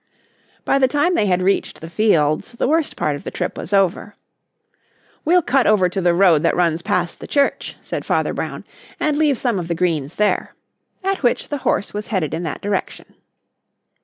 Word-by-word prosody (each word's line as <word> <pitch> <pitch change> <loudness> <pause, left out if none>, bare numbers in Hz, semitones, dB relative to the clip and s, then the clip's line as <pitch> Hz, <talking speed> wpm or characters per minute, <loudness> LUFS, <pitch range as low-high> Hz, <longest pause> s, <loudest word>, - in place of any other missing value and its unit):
By 275 - +2
the 260 - +4
time 290 +6 +1
they 210 -12 +2
had 180 -1 +1
reached 195 +1 0
the 160 - -8
fields 165 -3 +1
the 235 - -1
worst 315 +1 +1
part 150 -1 0
of 145 - -9
the - - -5
trip - - -4
was - - -7
over. 195 +1 +1 1.1
"We'll 350 +2 +4
cut 260 -1 +2
over 195 -4 +4
to 190 +2 -3
the 175 -1 +3
road 175 -5 +5
that 165 - +2
runs 170 -2 +1
past 175 0 -1
the - - -9
church," 280 -1 0
said - - -4
Father - - 0
Brown, - - -5 0.3
"and 305 -1 +1
leave 295 -3 +2
some 235 -6 0
of 170 - -5
the 170 - -1
greens 160 -4 -1
there," 210 0 0 0.5
at 390 0 -1
which 245 -3 0
the 290 - -3
horse 205 - -1
was 210 +1 -4
headed 180 -8 -1
in 165 - -2
that 160 -4 -5
direction. 200 -2 -4
195 Hz, 195 wpm, -20 LUFS, 170-265 Hz, 1.1 s, road